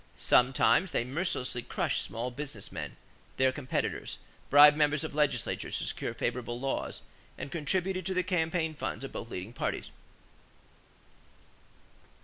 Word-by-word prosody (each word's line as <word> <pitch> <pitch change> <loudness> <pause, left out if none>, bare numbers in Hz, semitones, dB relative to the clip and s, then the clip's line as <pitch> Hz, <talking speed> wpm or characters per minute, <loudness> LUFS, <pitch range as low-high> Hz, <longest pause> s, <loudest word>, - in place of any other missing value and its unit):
Sometimes 125 +6 +4
they 120 - 0
mercilessly 130 -3 -1
crushed - - -1
small 120 +3 -4
business 135 -5 -5
men, - - -5 0.4
their 130 0 +4
competitors, 130 -1 -3 0.3
bribed 145 +1 +9
members 150 -1 +2
of - - -4
legislatures 150 -1 0
to - - -2
secure - - -3
favorable 120 -1 -2
laws, 135 +1 -2 0.4
and 140 - -6
contributed 185 +4 0
to 190 - -1
the 185 - +2
campaign 165 -3 0
funds 135 -4 -4
of 135 - -6
both 115 - -6
leading 95 +2 -6
parties. - - -3
145 Hz, 130 wpm, -30 LUFS, 125-160 Hz, 0.4 s, bribed